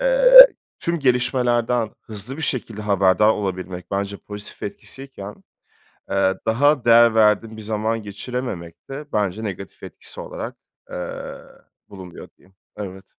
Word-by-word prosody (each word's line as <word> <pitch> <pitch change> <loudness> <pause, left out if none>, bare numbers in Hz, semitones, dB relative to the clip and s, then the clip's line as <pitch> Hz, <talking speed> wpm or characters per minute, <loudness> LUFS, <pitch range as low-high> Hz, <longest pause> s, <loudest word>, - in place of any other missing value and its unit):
eee, - - +9 0.3
tüm 170 0 -2
gelişmelerden 125 -3 +1
hızlı 110 +5 -7
bir 160 - -6
şekilde 115 -6 -3
haberdar 100 +1 +3
olabilmek, 95 -4 -3
bence 100 0 -2
pozitif 105 +1 -9
etkisiyken, 105 -1 -9 0.8
eee, 95 -1 +2
daha 140 +4 +2
değer 115 -1 +6
verdiğim 110 0 +2
bir 110 - -9
zaman 110 +1 -2
geçirememek 100 -5 -7
de, 140 +3 -6
bence 105 0 -1
negatif 100 -2 -7
etkisi - - -10
olarak, - - -7 0.3
eee, - - -6 0.5
bulunuyor 95 -3 -11
diyeyim. 95 - -25 0.2
Evet. 95 -2 -8
110 Hz, 125 wpm, -21 LUFS, 100-125 Hz, 0.8 s, eee